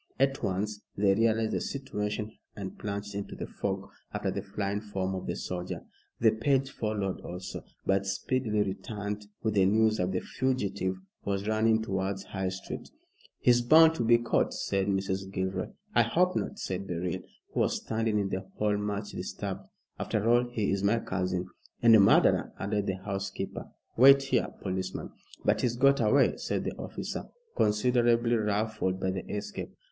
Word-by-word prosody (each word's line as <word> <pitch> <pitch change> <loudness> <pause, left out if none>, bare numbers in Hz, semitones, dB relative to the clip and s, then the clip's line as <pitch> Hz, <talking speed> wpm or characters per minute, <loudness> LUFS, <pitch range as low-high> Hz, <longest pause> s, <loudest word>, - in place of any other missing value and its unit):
At 135 0 +2
once 105 +2 -2 0.2
they 100 -1 +4
realized 110 +1 +2
the - - -1
situation, 105 -5 -3 0.2
and 100 -2 -7
plunged 100 0 -4
into 100 0 -5
the - - -5
fog - - -3 0.2
after - - -1
the - - -3
flying 100 0 -3
form 95 -3 -3
of 95 - -4
the - - -1
soldier. 90 0 -5 0.3
The 110 -1 +5
page 135 +5 +1
followed 105 -5 -2
also, 90 +1 -6 0.2
but 95 0 +2
speedily 105 +1 0
returned 105 +1 -4 0.2
with 110 -1 +1
the 95 -2 +4
news 110 +1 +3
that 90 +1 0
the 90 - -1
fugitive 100 -8 -1 0.3
was 100 0 -2
running 110 0 +3
towards 95 -2 -2
High 95 -1 -3
Street. 95 +1 -6 0.5
"He's 120 -1 +5
bound 160 +6 +7
to 140 - -1
be 120 +1 +6
caught," 120 -1 +1
said 95 0 0
Mrs. 95 -1 -1
Gilroy. 95 -1 -2 0.3
"I - - +6
hope 180 +1 +2
not," 205 - -2
said 95 - -4
Beryl, 90 0 -2 0.3
who - - -1
was - - +2
standing 110 -1 -1
in 100 -2 0
the 95 0 -3
hall 105 -1 +2
much 105 0 -3
disturbed. 95 +1 -5 0.3
"After 110 +1 -1
all, 120 +1 +4
he 110 -5 0
is 100 0 0
my 105 +3 +3
cousin." 90 -4 -1 0.4
"And 115 -1 +8
a - - +8
murderer," 100 - +5
added 100 +1 -1
the 95 - 0
housekeeper. 95 0 -4 0.3
"Wait 135 +3 +8
here, 135 - +1 0.2
policeman." 95 -1 -3 0.3
"But - - +3
he's 120 -1 +1
got 140 +2 +4
away," 130 +6 +4
said - - -2
the - - -2
officer, - - -5 0.3
considerably 120 +2 +3
ruffled 105 -3 0
by 95 - 0
the 95 0 -3
escape. 105 0 -5
105 Hz, 170 wpm, -29 LUFS, 95-115 Hz, 0.5 s, And